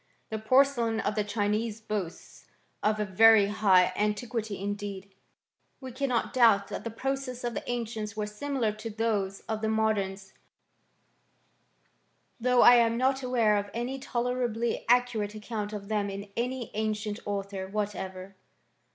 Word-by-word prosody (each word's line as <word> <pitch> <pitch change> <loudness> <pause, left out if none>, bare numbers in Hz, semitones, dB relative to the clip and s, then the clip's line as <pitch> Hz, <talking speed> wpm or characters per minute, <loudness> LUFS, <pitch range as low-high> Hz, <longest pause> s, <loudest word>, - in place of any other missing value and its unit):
The 220 - -2
porcelain 235 -1 +3
of - - -1
the 210 - 0
Chinese 210 +1 -1
boasts 210 -6 -6 0.3
of 215 0 +1
a 210 - 0
very 220 +2 +6
high 190 -3 +4
antiquity 210 0 -2
indeed. 200 -1 -5 0.7
We 260 -2 -8
cannot 255 -2 -1
doubt 225 -6 +4
that - - -5
the 230 - -3
processes 260 +1 -4
of 240 -1 -2
the - - -5
ancients 225 -3 -4
were 210 - -1
similar 230 +2 -2
to 215 +2 -7
those 210 -3 -1
of 220 -1 -4
the 220 - 0
modems, 205 -3 -1 2.1
though 250 +1 +4
I 245 0 +9
am 230 -1 +3
not 265 +2 +1
aware 235 -5 +2
of 205 0 -3
any 250 +3 -3
tolerably 240 -2 -2
ac 245 +1 +6
curate 210 -3 -3
account 210 -1 -4
of 205 -2 -6
them 210 -1 -1
in 200 +1 -7
any 245 0 -3
ancient 215 0 -2
author 200 -1 -3
what 210 +1 -2
ever. 190 0 -7
220 Hz, 150 wpm, -28 LUFS, 205-240 Hz, 2.1 s, I